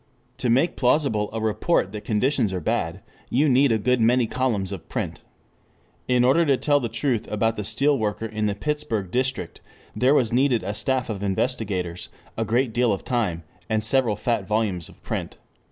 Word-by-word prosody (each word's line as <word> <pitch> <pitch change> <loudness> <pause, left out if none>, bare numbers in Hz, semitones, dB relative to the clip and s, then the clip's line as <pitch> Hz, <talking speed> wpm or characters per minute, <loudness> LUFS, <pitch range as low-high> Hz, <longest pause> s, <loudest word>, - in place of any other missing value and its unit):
To 125 - 0
make 135 +9 +3
plausible 125 -5 +2
a 115 - -3
report 110 - +1
that 105 0 -7
conditions 110 0 +1
are 95 - -2
bad, 80 - -2 0.3
you 145 +5 +3
need 135 0 +4
a 110 - +3
good 125 +3 +1
many 120 +2 +4
columns 110 -6 -1
of 95 -4 -8
print. - - -4 0.9
In 125 -1 +3
order 135 +7 +4
to 140 -4 +3
tell 145 +1 +2
the 120 -4 -3
truth 115 0 -1
about 110 +2 +1
the 105 - -4
steel 135 +7 +1
worker 110 +1 -2
in 110 -1 -2
the 100 - -1
Pittsburgh 115 -8 -2
district, 130 +3 -2 0.3
there 130 +4 +3
was 120 -5 +2
needed 125 -4 +2
a 100 +2 -3
staff 125 +4 -1
of 100 -2 -5
investigators, 95 -4 -2 0.3
a 115 - -1
great 120 +2 +1
deal 120 0 +2
of 100 - -3
time, 105 -10 -1 0.3
and 110 -1 +1
several 115 -1 +2
fat 110 -2 -1
volumes 105 -6 -1
of - - -17
print. - - -4
115 Hz, 185 wpm, -24 LUFS, 105-130 Hz, 0.9 s, need